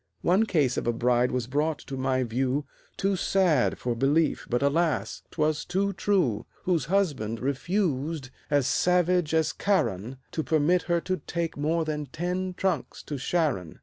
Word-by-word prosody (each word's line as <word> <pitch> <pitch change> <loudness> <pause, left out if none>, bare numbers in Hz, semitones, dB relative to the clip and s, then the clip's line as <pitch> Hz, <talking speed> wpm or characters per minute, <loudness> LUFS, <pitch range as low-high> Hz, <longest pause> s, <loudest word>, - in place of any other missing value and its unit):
One 195 +6 +3
case 145 - +2
of - - -2
a 120 - +2
bride 125 +1 +2
was 125 -2 -1
brought 150 +4 0
to 135 - -5
my 130 0 0
view, 130 +4 -1 0.3
Too 195 0 +1
sad 180 -8 +2
for 125 - -2
belief, 140 +6 +1
but 120 +3 +1
alas! 160 +3 +1
'twas 155 -1 0
too 200 +2 0
true, 175 - +1 0.2
Whose 170 -7 +1
husband 140 - 0
refused, 145 -1 -1 0.2
as 145 -3 +2
savage 180 0 +2
as 160 -1 +2
Charon, 130 - 0
To 160 - -1
permit 160 +3 +2
her 170 -1 +2
to 185 +1 -1
take 170 -2 -3
more 160 +3 0
than 150 -2 -3
ten 180 +5 -3
trunks 185 -7 -2
to 145 -3 -5
Sharon. 135 - -1
155 Hz, 160 wpm, -27 LUFS, 130-175 Hz, 0.3 s, One